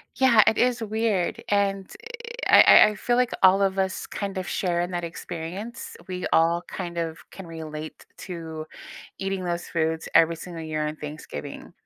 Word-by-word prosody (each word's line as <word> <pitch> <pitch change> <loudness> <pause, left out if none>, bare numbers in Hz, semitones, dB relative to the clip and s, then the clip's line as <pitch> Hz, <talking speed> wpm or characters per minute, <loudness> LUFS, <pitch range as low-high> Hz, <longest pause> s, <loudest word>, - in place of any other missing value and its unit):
Yeah, 235 -5 +6
it 220 - +3
is 245 -1 +2
weird. 215 -4 -1
And 195 -1 0 0.6
i - - +8
I - - +9
I 210 - -6
feel 240 +2 0
like 250 -1 +2
all 190 +1 +6
of 195 0 +1
us 190 0 -1
kind 200 -2 -5
of 185 - -3
share 175 -2 0
in 175 +1 -3
that 175 -1 -3
experience. 180 +8 -7
We 180 -1 -4
all 170 +2 +3
kind 175 -2 -6
of 165 -1 -3
can 190 -3 -10
relate 155 -1 -8 0.2
to 160 -3 -6 0.5
eating 195 -1 -3
those 175 0 -3
foods 160 -1 -1
every 165 0 +5
single 165 -1 -8
year 155 -1 -2
on 155 - -4
Thanksgiving. 150 - -8
180 Hz, 170 wpm, -25 LUFS, 165-195 Hz, 0.6 s, I